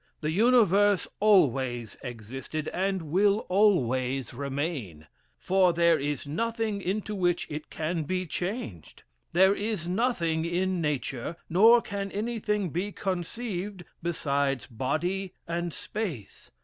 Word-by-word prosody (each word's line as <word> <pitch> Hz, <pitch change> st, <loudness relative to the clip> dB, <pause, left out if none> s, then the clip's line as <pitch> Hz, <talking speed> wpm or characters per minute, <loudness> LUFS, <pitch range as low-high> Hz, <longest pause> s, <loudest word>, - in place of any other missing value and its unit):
The 155 Hz, 0 st, -1 dB
universe 205 Hz, -2 st, +4 dB
always 130 Hz, -, +3 dB
existed, 130 Hz, +6 st, -6 dB
and 185 Hz, -4 st, -1 dB
will 200 Hz, +4 st, +3 dB
always 135 Hz, -, +2 dB
remain; 135 Hz, -, -4 dB, 0.3 s
for 185 Hz, -2 st, +3 dB
there 170 Hz, -1 st, +4 dB
is 145 Hz, -1 st, -2 dB
nothing 225 Hz, +6 st, -2 dB
into 205 Hz, +3 st, -2 dB
which 175 Hz, -3 st, +1 dB
it 150 Hz, +1 st, -6 dB
can 160 Hz, 0 st, -2 dB
be 185 Hz, +3 st, -1 dB
changed. 170 Hz, -, -5 dB, 0.3 s
There 190 Hz, +3 st, +6 dB
is 205 Hz, -4 st, -3 dB
nothing 175 Hz, -6 st, 0 dB
in 180 Hz, +1 st, 0 dB
Nature, 140 Hz, -1 st, -2 dB
nor 225 Hz, +7 st, +6 dB
can 200 Hz, -1 st, -4 dB
anything 210 Hz, -4 st, -1 dB
be 185 Hz, +6 st, -2 dB
conceived, 190 Hz, 0 st, -4 dB, 0.2 s
besides 140 Hz, -5 st, 0 dB
body 175 Hz, -, -2 dB
and 170 Hz, 0 st, -2 dB
space. 170 Hz, -, -6 dB
175 Hz, 115 wpm, -28 LUFS, 145-200 Hz, 0.3 s, There